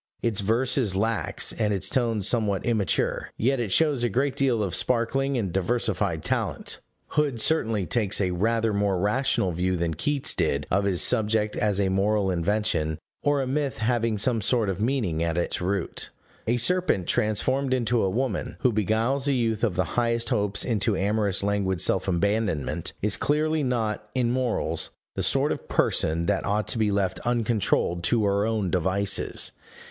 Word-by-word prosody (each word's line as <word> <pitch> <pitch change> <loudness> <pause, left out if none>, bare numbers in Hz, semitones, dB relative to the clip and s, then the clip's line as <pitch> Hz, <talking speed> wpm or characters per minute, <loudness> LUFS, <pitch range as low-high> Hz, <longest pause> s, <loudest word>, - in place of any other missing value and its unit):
Its 110 -4 +1
verse 120 +7 +1
is 105 -7 0
lax, 105 -3 0
and 105 -2 +1
its 95 -2 0
tone 115 -5 0
somewhat 105 -2 +1
immature; 110 -8 0
yet 130 +3 +1
it 115 -5 -2
shows 150 -3 +2
a 120 - +2
great 135 +3 0
deal 125 -6 +1
of 95 -3 -3
sparkling 130 +7 +1
and 100 -7 -2
diversified 95 -4 -1
talent. - - -2 0.3
Hood 145 -5 0
certainly 110 - +1
takes 105 0 +1
a 95 -3 +1
rather 110 +4 0
more 100 -2 +1
rational 105 -1 +1
view 90 +2 -1
than 85 -1 -1
Keats 140 - -1
did 70 +1 0
of 100 +2 +2
his 95 -3 +2
subject 110 -2 +2
as 105 -2 0
a 95 -1 +2
moral 100 +1 +1
invention, 85 -4 0 0.2
or 145 -1 +1
a - - -2
myth 135 -2 -2
having 115 -1 0
some 115 +2 +1
sort 110 0 +1
of 95 +1 -3
meaning 110 - 0
at 85 0 -1
its 85 - -1
root. 95 0 -2 0.4
A 120 +2 +2
serpent 175 - +1
transformed 130 +8 0
into 120 -2 +1
a 95 - +1
woman, 115 0 -2
who 125 -5 +2
beguiles 115 +7 0
a 140 - +2
youth 115 -3 -1
of 105 -7 +1
the 95 - +2
highest 115 -1 0
hopes 105 -4 0
into 110 -3 0
amorous 100 -1 +1
languid 100 -3 0
self 95 +3 +1
abandonment, 100 -3 -1
is 105 -1 +2
clearly 155 +1 +1
not, 110 -5 -2
in 120 -2 +1
morals, 125 -2 -1 0.2
the - - -3
sort - - +1
of - - -5
person 80 +2 +1
that - - 0
ought 105 +1 -1
to 115 - -1
be 110 -1 +2
left 100 -2 -1
uncontrolled 110 -7 0
to 110 +2 +2
her 100 +1 +1
own 105 -5 -1
devices. 95 +3 +1
110 Hz, 175 wpm, -25 LUFS, 95-120 Hz, 0.4 s, shows